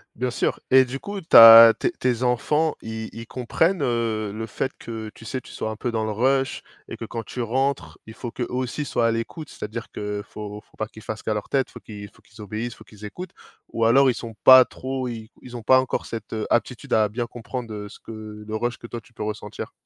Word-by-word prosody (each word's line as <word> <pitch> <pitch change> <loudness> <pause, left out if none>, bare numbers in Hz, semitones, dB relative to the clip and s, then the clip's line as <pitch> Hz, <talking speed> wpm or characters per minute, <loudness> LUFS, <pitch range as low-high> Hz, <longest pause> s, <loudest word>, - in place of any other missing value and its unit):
Bien 125 +2 -1
sûr. - - -1
Et 130 0 +7
du 130 +2 -6
coup, 200 -1 -6
tu 165 - +3
as 115 0 +12
tes - - 0
tes 125 -1 -1
enfants, 150 +6 +1
ils 110 0 -5
ils 115 0 -8
comprennent, 160 - 0
heu, 115 -4 -1
le 110 +2 -5
fait 130 +4 -3
que, 110 -2 -7
tu - - -14
sais, 130 +3 -4
tu - - -15
sois 110 - -4
un 110 - -6
peu 120 +2 -3
dans 110 -1 -1
le 110 - -2
rush 135 +5 +1 0.3
et - - -7
que - - -6
quand 115 - -5
tu 125 - -7
rentres, 125 - -1
il 110 - -9
faut 120 +1 -7
qu'eux 120 - -3
aussi 130 +3 -3
soient 120 -4 0
à - - +3
l'écoute? 115 +7 -4
C'est-à-dire 110 +2 -7
que 105 0 -4
faut 105 0 -8
faut - - -28
pas 110 - -2
qu'ils 110 +1 -14
fassent 110 0 -6
qu'à 110 - -1
leur 105 -1 -3
tête 135 -2 0
faut - - -11
qu'il 100 -2 -10
faut - - -24
qu'ils 105 - -15
obéissent, 110 +4 -5
faut - - -16
qu'ils 105 0 -11
écoutent? 180 - -8 0.4
Ou 115 0 +1
alors 135 +3 +5
ils - - -1
sont 115 -1 -7
pas 130 -1 +10
trop 130 -1 -4
ils 110 -2 -7
ils 125 -1 -10
ont 120 - -7
pas 130 +4 +5
encore 130 - -3
cette 110 -1 -7 0.2
aptitude 120 +1 -1
à 110 -1 +4
bien 120 +3 -3
comprendre, 120 0 -7
heu, 105 -1 -6
ce - - -14
que - - -11 0.3
le 110 - -5
rush 120 +2 -2
que - - -11
toi 120 0 -7
tu 115 - -24
peux - - -7
ressentir? 105 0 -5
115 Hz, 250 wpm, -23 LUFS, 110-130 Hz, 0.4 s, as